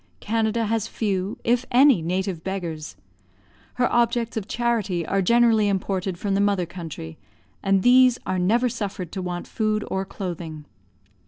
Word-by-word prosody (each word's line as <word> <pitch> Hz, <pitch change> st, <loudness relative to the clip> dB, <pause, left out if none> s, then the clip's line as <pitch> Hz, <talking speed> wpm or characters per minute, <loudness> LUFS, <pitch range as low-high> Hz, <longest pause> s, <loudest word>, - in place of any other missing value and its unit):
Canada 225 Hz, +1 st, 0 dB
has 225 Hz, 0 st, -1 dB
few, 200 Hz, -3 st, -2 dB
if 240 Hz, +1 st, +2 dB
any, 260 Hz, -, +5 dB
native 180 Hz, 0 st, -2 dB
beggars; 170 Hz, -, -5 dB, 0.8 s
her 250 Hz, -1 st, +2 dB
objects 235 Hz, -1 st, +1 dB
of 220 Hz, -4 st, -3 dB
charity 220 Hz, -8 st, -1 dB
are 195 Hz, +4 st, 0 dB
generally 225 Hz, +1 st, +4 dB
imported 190 Hz, -2 st, -1 dB
from 200 Hz, +2 st, -2 dB
the 195 Hz, -, +2 dB
mother 200 Hz, -3 st, +1 dB
country, 160 Hz, -, -8 dB, 0.4 s
and 195 Hz, -1 st, +2 dB
these 250 Hz, 0 st, +6 dB
are 185 Hz, -, -1 dB
never 230 Hz, +8 st, +2 dB
suffered 205 Hz, -7 st, -4 dB
to 190 Hz, -, -4 dB
want 175 Hz, -1 st, -4 dB
food 215 Hz, -1 st, -1 dB
or 190 Hz, 0 st, 0 dB
clothing. 170 Hz, -6 st, -6 dB
200 Hz, 150 wpm, -24 LUFS, 180-230 Hz, 0.8 s, these